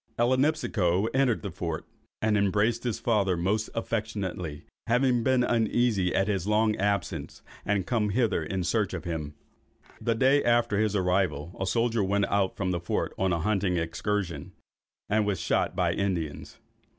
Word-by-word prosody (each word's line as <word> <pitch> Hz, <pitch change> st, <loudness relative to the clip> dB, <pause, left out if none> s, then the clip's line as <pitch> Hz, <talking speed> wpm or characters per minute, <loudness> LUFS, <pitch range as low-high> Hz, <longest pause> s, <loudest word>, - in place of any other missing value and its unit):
Ellinipsico 120 Hz, -, +2 dB
entered 130 Hz, -5 st, +2 dB
the 100 Hz, -, -4 dB
fort, 85 Hz, -2 st, -4 dB, 0.4 s
and 110 Hz, -1 st, +3 dB
embraced 105 Hz, +3 st, +1 dB
his 120 Hz, -4 st, -1 dB
father 100 Hz, -6 st, +1 dB
most 105 Hz, +5 st, 0 dB
affectionately, 100 Hz, -9 st, -3 dB, 0.2 s
having 125 Hz, 0 st, +3 dB
been 130 Hz, +1 st, +2 dB
uneasy 115 Hz, -5 st, +1 dB
at 95 Hz, +1 st, +2 dB
his 100 Hz, -3 st, -1 dB
long 105 Hz, 0 st, +2 dB
absence, 100 Hz, +1 st, -2 dB, 0.2 s
and 100 Hz, -2 st, 0 dB
come 110 Hz, -2 st, 0 dB
hither 110 Hz, -5 st, +1 dB
in 90 Hz, +4 st, -2 dB
search 95 Hz, +2 st, 0 dB
of 85 Hz, -, -5 dB
him. 75 Hz, -4 st, -4 dB, 0.7 s
The 115 Hz, -, +1 dB
day 135 Hz, +4 st, +4 dB
after 120 Hz, -3 st, +2 dB
his 105 Hz, -1 st, +1 dB
arrival, 90 Hz, -4 st, 0 dB
a 95 Hz, -, -1 dB
soldier 115 Hz, +2 st, +1 dB
went 100 Hz, +1 st, +1 dB
out 100 Hz, -2 st, +1 dB
from 95 Hz, -2 st, -1 dB
the 85 Hz, -, -1 dB
fort 85 Hz, -, -2 dB
on 95 Hz, -1 st, +2 dB
a 85 Hz, -2 st, 0 dB
hunting 95 Hz, -1 st, +1 dB
excursion, 85 Hz, -1 st, -3 dB, 0.5 s
and 105 Hz, +1 st, +2 dB
was 100 Hz, -4 st, -1 dB
shot 85 Hz, -, 0 dB
by -, -, +1 dB
Indians. 80 Hz, -6 st, -3 dB
100 Hz, 160 wpm, -27 LUFS, 90-115 Hz, 0.7 s, day